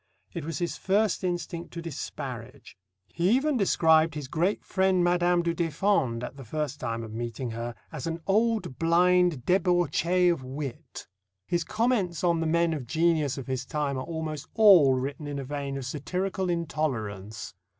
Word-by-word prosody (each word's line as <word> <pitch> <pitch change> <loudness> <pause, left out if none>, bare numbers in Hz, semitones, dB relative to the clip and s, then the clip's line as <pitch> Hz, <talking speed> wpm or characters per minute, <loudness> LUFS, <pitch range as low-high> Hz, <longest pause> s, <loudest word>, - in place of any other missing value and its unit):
It 170 - -4
was 165 -3 -3
his 175 +2 -2
first 200 0 +1
instinct 175 -1 -3
to 170 - -5
disparage. 135 -5 -7 0.4
He 170 +3 +1
even 290 +2 +1
described 160 -7 +3
his 145 -3 -5
great 175 +8 0
friend 190 -2 +2
Madame 175 0 +3
du 170 0 0
Deffand, 165 - 0
at 135 - -6
the 135 - -8
first 145 +3 -3
time 115 -2 -3
of 110 -1 -8
meeting 120 +1 -4
her, 115 +1 -5 0.2
as - - -5
"an 165 0 -3
old 215 - +1
blind 175 -3 +3
débauchée 180 -1 +3
of 145 -6 -7
wit." 135 0 -7 0.4
His 170 +7 0
comments 215 -4 0
on 170 -2 +3
the 165 - 0
men 170 +1 +2
of 140 -6 -5
genius 155 -1 +1
of 135 - -5
his 130 0 -2
time 145 0 -2
are 130 - -3
almost 160 0 -5
all 185 - +7
written 140 +3 -4
in 145 -1 -4
a 140 - -3
vein 140 0 -4
of 135 - -5
satirical 185 +7 -2
intolerance. 115 - -3
160 Hz, 170 wpm, -27 LUFS, 135-180 Hz, 0.4 s, all